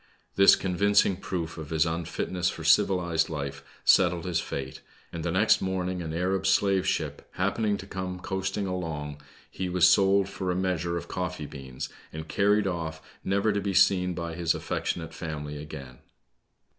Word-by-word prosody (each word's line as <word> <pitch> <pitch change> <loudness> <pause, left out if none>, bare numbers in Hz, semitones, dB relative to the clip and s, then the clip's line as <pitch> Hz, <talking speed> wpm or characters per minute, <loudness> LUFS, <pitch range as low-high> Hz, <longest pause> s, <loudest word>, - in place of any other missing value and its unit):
This 100 0 +8
con 90 -2 -3
vincing 100 -1 +3
proof 85 -3 -4
of 75 -2 -7
his 80 -1 +2
unfitness 85 +2 -1
for - - -7
civilized 85 -4 +3
life 70 -3 -5 0.2
settled 85 -1 +4
his 90 -2 0
fate, 65 -1 -5 0.3
and 85 -1 -4
the 85 - -1
next 95 +6 +3
morning 90 -1 -2
an 80 -2 -4
Arab 95 +3 0
slave 95 0 +3
ship - - -2
happening 100 +2 0
to 95 - -9
come 95 -1 -5
coasting 95 +2 -2
along, 80 -6 -4 0.3
he 95 -1 -3
was 90 0 +5
sold 95 +1 +4
for 100 -2 -4
a 90 - +1
measure 90 -2 -1
of - - -6
coffee 90 -4 -4
beans, 65 -3 -7 0.2
and 80 0 -7
carried 105 +3 +2
off, 85 -4 -3 0.2
never 100 +2 +1
to 100 - 0
be 100 -1 -2
seen 90 -2 +4
by 85 -1 -4
his 85 -1 0
affectionate 80 -2 -3
family 75 -3 -5
again. 70 -4 -9
90 Hz, 170 wpm, -27 LUFS, 80-95 Hz, 0.3 s, This